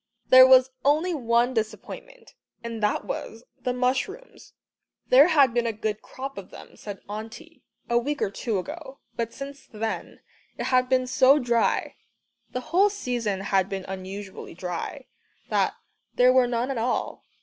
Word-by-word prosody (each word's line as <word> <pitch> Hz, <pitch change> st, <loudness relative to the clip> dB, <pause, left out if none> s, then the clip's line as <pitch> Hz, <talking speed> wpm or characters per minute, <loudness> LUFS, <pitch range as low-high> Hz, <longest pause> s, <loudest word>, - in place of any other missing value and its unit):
There 255 Hz, 0 st, +9 dB
was 260 Hz, 0 st, +6 dB
only 310 Hz, +6 st, +2 dB
one 240 Hz, -3 st, +1 dB
disappointment 255 Hz, -, -6 dB, 0.3 s
and 230 Hz, -1 st, -5 dB
that 210 Hz, -, 0 dB
was 225 Hz, +2 st, -6 dB, 0.2 s
the 250 Hz, -, -1 dB
mushrooms! 265 Hz, -, -3 dB, 0.6 s
There 270 Hz, +5 st, +8 dB
had 285 Hz, -8 st, +4 dB
been 240 Hz, -1 st, +1 dB
a -, -, +1 dB
good 215 Hz, -1 st, -3 dB
crop 275 Hz, +1 st, -7 dB
of -, -, -11 dB
them, -, -, -13 dB
said 200 Hz, -2 st, -8 dB
Auntie, 220 Hz, +3 st, -9 dB, 0.3 s
a 235 Hz, 0 st, +3 dB
week 285 Hz, +4 st, -3 dB
or 195 Hz, -, -1 dB
two 215 Hz, +1 st, -2 dB
ago, 280 Hz, -, -7 dB, 0.2 s
but 230 Hz, -1 st, -3 dB
since 275 Hz, +1 st, -9 dB
then 220 Hz, 0 st, -5 dB, 0.4 s
it -, -, -3 dB
had 255 Hz, 0 st, +3 dB
been 255 Hz, -1 st, +2 dB
so 260 Hz, +2 st, +5 dB
dry 240 Hz, -4 st, 0 dB, 0.5 s
the 250 Hz, -, -4 dB
whole 395 Hz, +4 st, +5 dB
season 240 Hz, -, -2 dB
had 195 Hz, -1 st, +1 dB
been 195 Hz, -1 st, -4 dB
unusually 190 Hz, -1 st, -7 dB
dry 180 Hz, -, -5 dB, 0.4 s
that -, -, +1 dB, 0.4 s
there 250 Hz, +1 st, +5 dB
were 255 Hz, -1 st, +4 dB
none 240 Hz, +2 st, -1 dB
at 255 Hz, -, -2 dB
all. 240 Hz, +2 st, -2 dB
245 Hz, 160 wpm, -25 LUFS, 220-270 Hz, 0.6 s, There